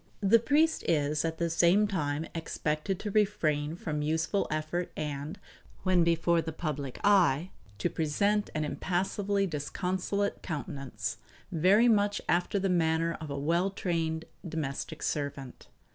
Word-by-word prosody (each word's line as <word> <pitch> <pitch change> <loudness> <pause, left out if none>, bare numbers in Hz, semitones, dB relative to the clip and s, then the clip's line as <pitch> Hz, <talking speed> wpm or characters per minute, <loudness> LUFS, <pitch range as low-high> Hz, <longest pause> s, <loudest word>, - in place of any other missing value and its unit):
The 210 +3 +6
priest 300 +7 +2
is 150 -1 +1
at 165 -1 -2
the 170 - 0
same 170 +5 +4
time 150 -5 -1
expected 160 +2 -2
to 210 - -3
refrain 160 -8 +1
from 150 -3 -3
useful 160 +6 0
effort 155 +3 -2
and, 150 +3 -4 0.4
when 185 -2 +4
before 170 0 +3
the 160 - -4
public 145 -4 -4
eye, 185 -5 +4 0.3
to - - 0
present 200 +7 +1
an 155 0 0
impassively 195 +5 0
disconsolate 185 +5 -2
countenance, 145 -4 -4 0.3
very 190 +8 +5
much 205 -3 +3
after 175 +3 +1
the 195 0 +1
manner 165 -2 +1
of 155 - -6
a 140 - -3
well 170 +6 +1
trained 165 -4 -2 0.2
domestic 160 -2 -4
servant. 140 - -4
165 Hz, 135 wpm, -30 LUFS, 150-195 Hz, 0.4 s, The